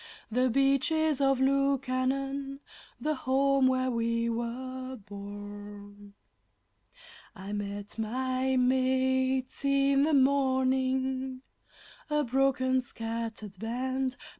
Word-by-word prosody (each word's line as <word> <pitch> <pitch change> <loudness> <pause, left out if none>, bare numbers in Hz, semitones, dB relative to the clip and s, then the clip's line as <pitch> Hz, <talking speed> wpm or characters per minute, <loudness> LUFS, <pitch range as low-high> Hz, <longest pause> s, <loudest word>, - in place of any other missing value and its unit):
The 250 +3 +2
Beaches 275 +3 +2
of 270 -1 +3
Lukannon 275 0 0 0.4
the 310 - 0
home 270 0 +2
where 255 0 +1
we 230 0 0
were 255 +3 -4
born! 205 -1 -10 1.2
I 195 +1 -7
met 205 +1 -5
my 255 +3 0
mates 260 +1 +1
in 275 0 +3
the 305 +1 +3
morning, 260 -1 +1 0.7
a 300 0 +2
broken, 260 0 +2
scattered 225 -4 -5
band. 255 +4 -2
260 Hz, 90 wpm, -29 LUFS, 230-270 Hz, 1.2 s, of